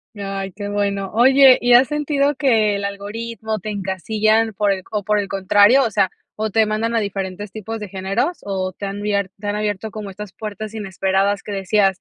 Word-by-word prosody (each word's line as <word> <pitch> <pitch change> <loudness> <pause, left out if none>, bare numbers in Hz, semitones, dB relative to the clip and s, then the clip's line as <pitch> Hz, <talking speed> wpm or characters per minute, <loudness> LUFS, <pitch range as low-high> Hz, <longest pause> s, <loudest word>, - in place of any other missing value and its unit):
Ya, 195 -1 -4
ay, 195 0 -4
qué 205 +1 -6
bueno. 200 -1 -1
Oye, 265 +3 +6
¿y 245 0 +4
has 250 +1 +7
sentido 290 -1 0
que 225 -7 +2
el 200 - -3
algoritmo 215 +2 -4
te 215 - -6
encasillan, 215 +3 0
por 205 0 +1
el 190 -1 -1
o 210 -2 -2
por 210 +2 +1
el 200 - -2
contrario, 205 +7 +4
o 230 - -1
sea, 195 -3 +2 0.3
o 220 0 -2
te 220 +2 +3
mandan 220 +2 -1
a 230 - +3
diferentes 195 -1 -4
tipos 220 +2 -6
de 210 -2 -7
géneros, 195 - -2
o 190 -2 -2
te 200 +2 -6
han 200 +1 -5
bier 200 -2 0
te 205 - -10
han 205 - -1
abierto 210 0 -2
como 210 -1 -6
estas 200 0 -9
puertas 215 +1 -6
inesperadas 195 -1 0
que - - -7
decías: 195 -1 +1
205 Hz, 210 wpm, -20 LUFS, 195-220 Hz, 0.3 s, has